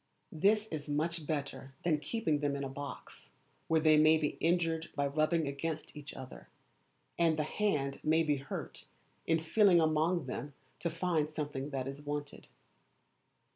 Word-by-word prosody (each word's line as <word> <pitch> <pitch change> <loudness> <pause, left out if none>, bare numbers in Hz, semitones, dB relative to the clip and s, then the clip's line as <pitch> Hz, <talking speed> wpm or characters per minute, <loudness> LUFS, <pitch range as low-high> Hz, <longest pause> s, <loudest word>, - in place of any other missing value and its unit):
This 210 +6 +3
is 150 -2 -5
much 155 +1 -1
better 140 -3 -4
than 155 -3 +2
keeping 155 -1 0
them 145 -1 0
in 140 - -3
a - - -2
box, 140 +1 -8 0.4
where 160 0 +3
they 155 -1 +5
may 155 +1 +6
be 150 -2 +1
injured 165 -1 +1
by 140 - +1
rubbing 155 +3 +1
sgainst 155 +3 -4
each 145 -1 -9
other, 130 -1 -10 0.7
and 165 -2 +3
the 155 - +1
hand 150 -6 -1
may 160 +2 +3
be 150 -2 +1
hurt 135 0 -7 0.4
in 165 0 +3
feeling 180 +2 +5
among 160 +1 +2
them 140 +2 -5 0.2
to 170 - -1
find 165 -2 0
the 150 - 0
thing 140 -1 -5
that 135 -2 -3
is 135 +1 -6
wanted. 145 0 -5
155 Hz, 165 wpm, -33 LUFS, 145-165 Hz, 0.7 s, may